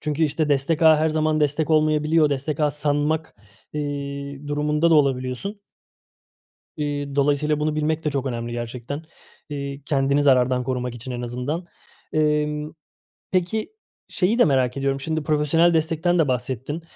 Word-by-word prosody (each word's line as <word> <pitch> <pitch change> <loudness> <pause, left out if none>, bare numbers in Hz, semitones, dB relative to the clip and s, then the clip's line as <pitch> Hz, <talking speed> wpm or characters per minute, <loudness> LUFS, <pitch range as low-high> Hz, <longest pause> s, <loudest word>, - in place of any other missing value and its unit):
Çünkü 150 +1 -1
işte 155 +1 0
destek 145 +3 +1
ağı 160 -1 +7
her 160 +1 +2
zaman 155 0 +1
destek 150 +2 +1
olmayabiliyor. 155 0 +3
Destek 145 +2 -2
ağı 150 -1 +3
sanmak, 150 +2 -1 0.4
eee, 140 -1 -4
durumunda 150 +3 +1
da 165 - +6
olabiliyorsun. 135 - 0 1.2
Eee, 145 -2 -3
dolayısıyla 145 +1 +2
bunu 155 0 0
bilmek 155 +1 -1
de 150 - +1
çok 140 -1 -2
önemli 120 -2 -3
gerçekten. 120 +4 -5 0.5
Eee, 140 -1 -5
kendini 140 0 +2
zarardan 125 -2 +3
korumak 125 -1 -2
için 125 +2 -8
en 125 0 -4
azından. 125 +8 -3 0.5
Emm, 150 0 0 0.6
peki 190 - -1 0.3
şeyi 205 +6 +1
de 245 - +6
merak 130 -2 +1
ediyorum: 135 0 0
Şimdi 160 +2 -2
profesyonel 160 +3 +3
destekten 165 +2 +1
de 155 - +3
bahsettin. 130 +4 -3
150 Hz, 145 wpm, -23 LUFS, 135-155 Hz, 1.2 s, ağı